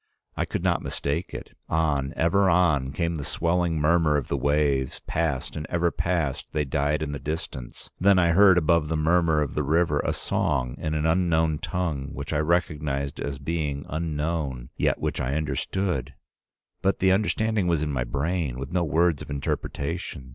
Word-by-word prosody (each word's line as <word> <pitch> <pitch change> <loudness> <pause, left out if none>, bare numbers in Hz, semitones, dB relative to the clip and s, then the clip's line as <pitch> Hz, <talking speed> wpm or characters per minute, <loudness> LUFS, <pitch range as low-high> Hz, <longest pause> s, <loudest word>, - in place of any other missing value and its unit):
I - - 0
could - - -4
not - - +2
mistake 75 +5 -3
it. - - -8
On, 75 -4 +1
ever 95 +4 +3
on, 80 -7 +3
came 85 +3 -1
the 75 - -4
swelling 85 +1 0
murmur 75 0 +3
of 70 - -4
the - - 0
waves, 70 -1 +1
past 80 -5 -1
and 75 0 -5
ever 85 0 +1
past 80 -7 -1
they 75 -1 0
died 70 +3 0
in 70 - -3
the 70 - -4
distance. 70 -4 -6
Then 100 +1 +5
I 85 -2 +4
heard 95 +1 +6
above 85 -2 +3
the 80 +1 -1
murmur 80 -1 +3
of 70 - -5
the 75 - 0
river 75 +1 +2
a - - 0
song 60 -1 -1
in 80 0 -2
an 75 0 0
unknown 80 -2 +2
tongue 80 -7 -3
which 70 +3 -5
I 75 - +1
recognized 75 -4 -1
as 70 -1 -3
being 70 -1 -3
unknown, 75 -5 -2
yet - - +1
which - - -2
I 65 +3 -1
understood; 80 +1 -2 0.7
but 95 - +2
the 95 0 +3
understanding 105 0 +1
was 85 -3 +1
in 75 - -2
my 65 -2 0
brain, 70 +1 -2
with 70 +2 -6
no 90 -1 +1
words 80 -1 +2
of - - -9
interpretation. 70 0 -4
80 Hz, 180 wpm, -25 LUFS, 70-85 Hz, 0.7 s, heard